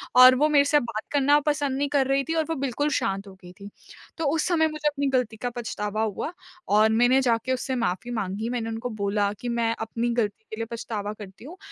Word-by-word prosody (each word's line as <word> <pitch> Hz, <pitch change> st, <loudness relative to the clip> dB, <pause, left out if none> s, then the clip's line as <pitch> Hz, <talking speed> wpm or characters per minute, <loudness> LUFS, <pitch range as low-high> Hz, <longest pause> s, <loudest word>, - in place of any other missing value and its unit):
और 255 Hz, 0 st, +9 dB
वो 300 Hz, +4 st, +3 dB
मेरे 285 Hz, -1 st, +5 dB
से 295 Hz, +1 st, +4 dB
बात 230 Hz, -4 st, -4 dB
करना 285 Hz, +1 st, +4 dB
पसंद 285 Hz, -2 st, -1 dB
नहीं 285 Hz, 0 st, 0 dB
कर 275 Hz, -2 st, +2 dB
रही 275 Hz, 0 st, +2 dB
थी -, -, +1 dB
और 320 Hz, -1 st, +1 dB
वो 325 Hz, -, 0 dB
बिल्कुल 270 Hz, 0 st, -2 dB
शांत 195 Hz, +1 st, -1 dB
हो 195 Hz, -, -11 dB
गई 180 Hz, -, -11 dB
थी। 200 Hz, +2 st, -11 dB, 0.5 s
तो 325 Hz, -, -2 dB
उस 320 Hz, -, +1 dB
समय 320 Hz, -3 st, +3 dB
मुझे 305 Hz, -1 st, -3 dB
अपनी 285 Hz, -1 st, 0 dB
गलती 250 Hz, -4 st, 0 dB
का 245 Hz, +2 st, -3 dB
पछतावा 215 Hz, -3 st, -3 dB
हुआ 220 Hz, -, -3 dB, 0.4 s
और 215 Hz, +2 st, +5 dB
मैंने 245 Hz, +4 st, +4 dB
जाके 245 Hz, 0 st, +1 dB
उससे 260 Hz, +1 st, -2 dB
माफ़ी 230 Hz, 0 st, -2 dB
माँगी। 215 Hz, +1 st, -3 dB
मैंने 235 Hz, -2 st, -2 dB
उनको 225 Hz, +2 st, -4 dB
बोला 205 Hz, -2 st, 0 dB
कि, 240 Hz, +3 st, -6 dB
"मैं 230 Hz, -1 st, 0 dB
अपनी 230 Hz, +2 st, -2 dB
गलती 220 Hz, -2 st, -1 dB
के 220 Hz, -, -4 dB
लिए 225 Hz, -, -2 dB
पछतावा 215 Hz, -3 st, -4 dB
करती 205 Hz, +1 st, -12 dB
हूँ। 340 Hz, +6 st, -10 dB
240 Hz, 230 wpm, -25 LUFS, 215-275 Hz, 0.5 s, और